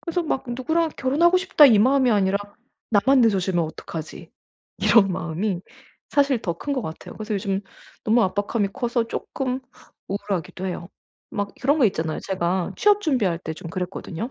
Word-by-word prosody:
그래서 345 0 -2
막 300 -5 -2
'누구랑 315 +7 0
결혼하고 315 +7 +3
싶다.' 365 -5 +6
이 225 -6 +6
마음이 260 +2 +4
아니라 200 -2 +2 0.5
'나만 260 +5 +4
늦어지면 190 -6 +2
어떡하지.' 160 0 -8 0.5
이런 195 -5 +5
마음이 175 +3 -2 0.5
사실 280 -4 +2
더 170 -6 -2
큰 285 - -3
것 260 -3 -1
같아요. 160 -5 -8
그래서 215 0 -4
요즘 195 0 -1 0.4
너무 230 +2 +4
압박감이 205 +2 0
커서 240 +1 -1
쪼끔 260 +2 -3 0.5
우울하기도 195 -2 -3
해요. 175 -2 -5 0.4
막 205 -1 -3
그런 285 +5 +2
거 265 - +4
있잖아요. 160 -5 -2
제가 185 -1 -1
취업 415 0 +4
준비할 245 - +1
때 160 - -5
좀 165 - -9
그랬거든요. 180 +4 -5
210 Hz, 365 characters per minute, -23 LUFS, 185-265 Hz, 0.5 s, 싶다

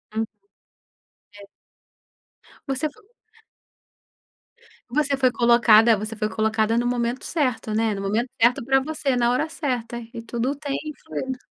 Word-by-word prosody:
Hum. 225 0 0 1.1
É. 205 - -12 1.3
Você 270 +3 0
fo 430 +9 -22 1.9
Você 280 +2 +1
foi 260 -2 +3
colocada 235 -2 +5
você 215 +2 -5
foi 215 0 -1
colocada 220 +1 +1
no 240 - +1
momento 245 +1 -1
certo, 255 -8 -1
né? 220 0 +1
No 195 - -5
momento 215 +6 -1
certo 235 +1 +4
pra 270 +1 +4
você, 285 -2 -1
na 240 -1 +2
hora 280 +6 0
certa 245 -7 -3 0.2
e 230 - -6
tudo 240 +4 -2
tem 285 -1 -3 0.3
fluido. 255 - -4
240 Hz, 135 wpm, -23 LUFS, 225-270 Hz, 1.9 s, colocada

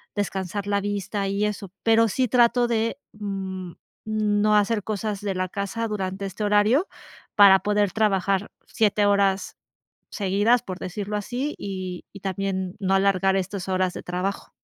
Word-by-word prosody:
descansar 200 -1 -3
la 200 0 +1
vista 200 0 -2
y 200 +1 -1
eso, 205 -3 -4
pero 225 0 +4
sí 255 +4 0
trato 240 0 +4
de, 230 +1 0 0.2
mm, 190 -3 -5 0.3
no 215 -1 +2
hacer 210 0 +2
cosas 210 -1 -3
de 205 -1 -2
la 185 0 -2
casa 200 +4 -3
durante 195 -2 -3
este 195 +2 -5
horario 210 - +3 0.5
para 200 -2 +8
poder 205 -1 +1
trabajar 195 -2 +1 0.2
7 210 -2 +2
horas 200 -1 +1 0.6
seguidas, 205 +4 +2
por 185 -1 -6
decirlo 205 +3 -4
así, 250 +8 -3
y 185 -2 -5
y 195 - -11
también 190 -1 -3
no 190 -1 +1
alargar 195 0 +3
estas 190 0 -3
horas 185 -1 +1
de - - -7
trabajo. 180 +3 -3
200 Hz, 150 wpm, -24 LUFS, 190-210 Hz, 0.6 s, para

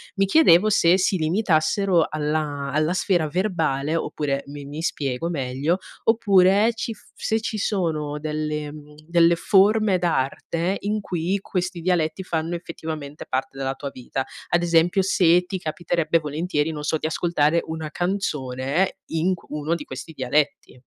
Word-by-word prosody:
Mi 195 0 +2
chiedevo 210 - +5
se 180 -2 +4
si 190 0 +1
limitassero 170 +1 +2
alla 150 -2 -2
alla 155 +2 +1
sfera 175 -4 +1
verbale 160 -5 0
oppure 140 -4 -2
mi 145 0 -8
mi 150 +3 -6
spiego 145 0 -2
meglio, 140 +3 -1 0.3
oppure 205 -1 +4
ci 230 0 -4
f - - -20
se 220 0 -1
ci 220 -1 -3
sono 155 -8 -1
delle 150 -1 -3
mhmm, 150 0 -13
delle 170 0 +4
forme 200 +2 +4
d'arte 170 +3 -1
in 210 +1 -1
cui 180 +2 -1
questi 180 -2 -3
dialetti 175 +1 0
fanno, 165 0 -2
effettivamente, 160 -4 -7
parte 135 +1 -3
della 135 0 -2
tua 140 0 -5
vita. 130 +1 -4 0.2
Ad 175 0 +2
esempio 170 +3 +3
se 180 -2 +4
ti 190 - -4
capiterebbe 165 0 0
volentieri, 150 +1 -1
non 150 -1 -6
so, 160 - 0
di 155 - -2
ascoltare 165 -1 +1
una 160 -1 -5
canzone 150 -3 -1
in 165 +3 0
c - - -18
uno 150 +2 -1
di 150 - -6
questi 130 +5 -8
dialetti. 140 +2 -1
165 Hz, 150 wpm, -23 LUFS, 150-185 Hz, 0.3 s, chiedevo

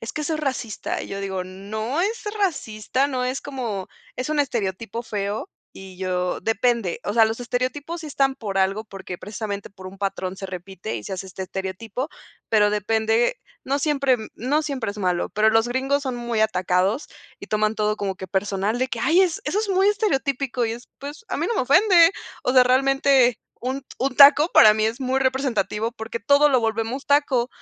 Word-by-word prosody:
"Es 225 - -6
que 305 - -3
eso 315 +2 -1
es 310 - -3
racista". 255 -7 -3
Yo 195 - -6
digo: 190 -2 -3
"No 215 - -4
es 430 +5 -1 0.2
racista, 265 - 0
no 255 -3 -2
es 255 +2 -2
como 240 -9 -4 0.3
es 255 +2 -3
un 300 - +2
estereotipo 230 -4 -2
feo", 210 -2 -3 0.3
y 190 -1 -11
yo 180 -1 -2
depende, 225 -2 0
o 205 - -2
sea, 225 -1 +6
los 225 +2 -2
estereotipos 265 +7 -3
están 275 -3 +1
por 200 -6 -4
algo 195 +3 +1
porque 195 -3 -8
precisamente 205 0 -6
por 190 -1 -12
un 190 - -10
patrón 190 -1 -3
se 195 - -8
repite 190 +2 -6
y - - -6
se 195 - -4
hace 190 +1 -6
este 190 0 -7
estereotipo, 190 +8 -4 0.4
pero 210 -2 +5
depende. 225 - +1 0.3
No 275 +2 0
siempre, 275 -3 +2
mm, 220 - -7
no 275 +6 0
siempre 265 -8 -3
es 210 - -9
malo. 180 -3 0
Pero 215 +1 +3
los 225 +2 +3
gringos 270 +3 0
son 260 -3 -3
muy 235 -2 -2
atacados 185 - +1 0.3
y - - -10
toman 215 0 +1
todo 210 0 0
como 195 -2 -3
que 190 - -7
personal 195 +3 -1
de 255 +1 0
que: 235 - -4
"Ay, 330 +10 +4
es 350 -4 0
eso 325 +8 0
es 430 -2 -2
muy 385 +1 +3
estereotípico", 275 - 0
y 225 - -2
es 240 +2 -9
pues 290 - -8
a - - -2
mí - - 0
no 470 - -1
me 380 - +1
ofende, 345 - +6 0.3
o 250 - +1
sea, 255 -1 +7
realmente 265 -1 +3 0.2
un 260 +2 -3
t 270 - -35
un 265 0 0
taco 290 +3 +8
para 215 0 +8
mí 215 - +1
es 225 +4 -1
muy 260 +1 0
representativo 260 -4 0
porque 230 0 -6
todo 285 +5 +4
lo 260 -2 +4
volvemos 225 +4 -2
taco, 280 -4 +2
235 Hz, 200 wpm, -23 LUFS, 205-275 Hz, 0.4 s, taco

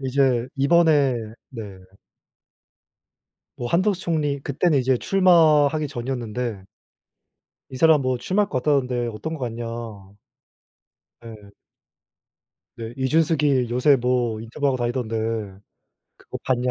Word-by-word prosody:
이제 130 -2 +1
이번에 145 -2 +3 0.4
네. 115 -4 -7 2.0
뭐 120 - -4
한덕수 190 - +1
총리 150 -4 -1
그때는 145 +2 +1
이제 130 0 +1
출마하기 155 -5 +3
전이었는데 120 -5 -4 1.1
"이 130 - -8
사람 160 +1 +5
뭐 130 -1 -1
출마할 200 +11 0
것 130 -3 -2
같다던데 125 -5 0
어떤 115 +8 -5
것 - - -10
같냐?" 120 -1 -4 1.6
네. 110 -3 -12 1.3
네. 115 0 -7
"이준석이 140 -2 +1
요새 125 +4 +3
뭐 120 -2 0
인터뷰하고 130 +4 -2
다니던데 120 -2 -2 1.0
그거 - - -9
봤냐." 125 -1 0
130 Hz, 235 characters per minute, -23 LUFS, 120-150 Hz, 2.0 s, 사람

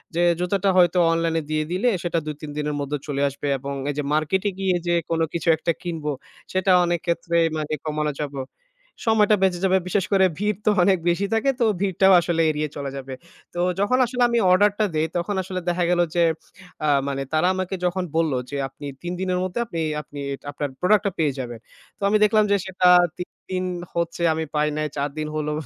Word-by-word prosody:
যে 170 - +2 0.2
"জুতাটা 195 +2 +1
হয়তো 180 0 +4
অনলাইনে 165 -1 0
দিয়ে 155 0 0
দিলে, 195 +7 +2
সেটা 175 -1 -1
২-৩ 150 0 -6
দিনের 150 0 -2
মধ্যে 145 +1 -2
চলে 140 -1 -2
আসবে" 140 +1 -6
এবং 140 +2 -5 0.2
এই - - -1
যে 150 - -1
মার্কেটে 185 +7 +1
গিয়ে 190 -2 +1
যে 175 - +2 0.2
কোনো 165 -1 +1
কিছু 170 - -3
একটা 170 - 0
কিনবো, 160 -4 -3 0.4
সেটা 185 0 +2
অনেকক্ষেত্রে 170 0 -1 0.2
মানে 155 0 -3
কমানো 150 0 -1
যাবো 145 -2 -4 0.7
সময়টা 215 -2 +4
বেঁচে 180 -2 +2
যাবে। 190 0 +4
বিশেষ 190 0 0
করে 190 -1 +5
ভিড় 210 0 -1
তো - - +5
অনেক 190 0 +4
বেশি 175 +4 +1
থাকে, 225 +5 +2
তো 235 - +3 0.2
ভিড়টাও 190 0 +4
আসলে 165 -1 0
এড়িয়ে 150 0 -2
চলে 140 -1 -4
যাবে। 135 -1 -7 0.4
তো 175 - -5 0.2
যখন 205 +6 +2
আসলে 245 +1 -4
আমি 235 0 +2
অর্ডার 205 +3 +5
টা 215 - +4
দেই, 155 +1 +1
তখন 185 +4 -2
আসলে 185 0 -4
দেখা 175 0 0
গেল 175 - +2 0.2
যে 170 - +4 0.6
অ্যা 155 - +1 0.2
মানে 135 -1 -2
তারা 155 +3 +3
আমাকে 185 0 -2
যখন 180 +1 0
বললো 160 -5 +1
যে, 145 - -4
"আপনি 135 +2 -11 0.2
৩ 175 +1 -4
দিনের 185 -1 0
মধ্যে 185 +4 -3
আপনি 170 -7 -5 0.2
আপনি 145 -1 -11 0.3
আপনার 145 0 -3
প্রোডাক্টটা 200 +2 +3
পেয়ে 155 -3 +2
যাবেন।" 120 -3 -5 0.4
তো - - -37
আমি 215 - +4
দেখলাম 215 0 +4
যে - - +5
সেটা 185 -1 +1 0.3
৩ 180 - -6 0.2
দিন 185 0 -1 0.3
হচ্ছে 170 0 -2
আমি 160 0 -2
পাই 150 0 +2
নাই। 155 - 0
৪ 140 +1 0
দিন 155 0 -2
হলো 150 0 -1
175 Hz, 200 wpm, -23 LUFS, 150-190 Hz, 0.7 s, করে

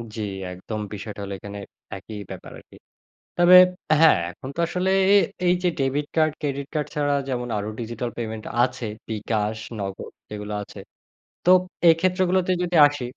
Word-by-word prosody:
জ্বি, 110 - -3 0.3
একদম 100 +4 -6
বিষয়টা 105 0 -7
হলো 100 0 -5
এখানে 100 0 -8 0.4
একই 105 +3 -9
ব্যাপার - - -9
আরকি। - - -19 0.6
তবে 175 +1 +7 0.4
হ্যাঁ, 160 - +7
এখন 130 - -10
তো - - -1
আসলে 180 +2 -1 0.2
এ - - +8 0.3
এই 175 - +5
যে 180 - +3
ডেবিট 140 +2 0
কার্ড, 155 -1 +3
ক্রেডিট 140 -2 -3
কার্ড 150 -1 -1
ছাড়া 145 -1 +1
যেমন 125 -2 -2
আরও 105 +1 -4
ডিজিটাল 120 +1 -4
পেমেন্ট 110 -2 -5 0.2
আছে। 125 -2 -4 0.2
বিকাশ, 110 0 -1 0.2
নগদ 95 -1 -6 0.2
এগুলো 105 0 -6
আছে। - - -12 0.7
তো - - +4 0.4
এই 165 - +9
ক্ষেত্রগুলোতে 185 0 +1
যদি 175 0 -2
আসি 145 -2 -5
130 Hz, 160 wpm, -23 LUFS, 105-165 Hz, 0.7 s, এই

